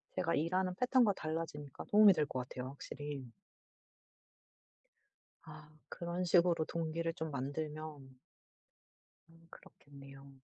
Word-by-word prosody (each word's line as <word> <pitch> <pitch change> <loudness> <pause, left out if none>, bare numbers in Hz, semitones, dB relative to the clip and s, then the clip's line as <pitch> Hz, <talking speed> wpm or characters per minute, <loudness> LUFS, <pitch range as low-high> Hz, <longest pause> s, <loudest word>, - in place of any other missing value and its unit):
제가 170 -2 +1
일하는 185 +4 0
패턴과 250 -2 +4
달라지니까 155 -4 -5
도움이 210 -1 +7
될 155 -4 +1
것 130 -3 -4
같아요 125 0 -5
확실히. 140 -2 -7 2.1
아 155 -1 -12 0.2
그런 175 +1 -3
식으로 175 -2 +4
동기를 165 0 -2
좀 160 -2 -4
만들면 145 0 -5 1.1
음 165 0 -20
그렇겠네요. 140 -1 -14
155 Hz, 245 characters per minute, -35 LUFS, 140-170 Hz, 2.1 s, 도움이